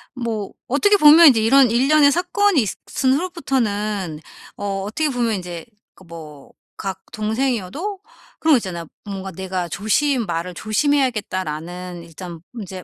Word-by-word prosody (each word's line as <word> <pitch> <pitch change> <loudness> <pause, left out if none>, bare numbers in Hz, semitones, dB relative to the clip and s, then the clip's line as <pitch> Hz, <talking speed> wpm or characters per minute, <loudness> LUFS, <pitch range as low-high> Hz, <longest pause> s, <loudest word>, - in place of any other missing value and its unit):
뭐 225 -5 -4 0.2
어떻게 410 +11 +3
보면 315 0 +8
이제 250 -6 +6
이런 255 +3 +5
일련의 285 +5 +4
사건이 360 +2 +2 0.3
있은 260 0 +1
후로부터는 215 - -2 0.4
어 195 -1 -3
어떻게 295 +10 -1
보면 240 -4 0
인제 175 -3 -7 0.3
그 - - -18
뭐 155 -4 -12 0.3
각 190 -1 -5
동생이어도 245 - -2 0.4
그런 320 -1 +4
거 - - +7
있잖아요. 180 -7 -5 0.2
뭔가 195 -1 -6
'내가 185 0 -4
조심 230 - 0
말을 170 +1 -3
조심해야겠다.'라는 185 - -2
일단 170 +1 -9
인제 190 -5 -8
215 Hz, 310 characters per minute, -20 LUFS, 185-275 Hz, 0.4 s, 보면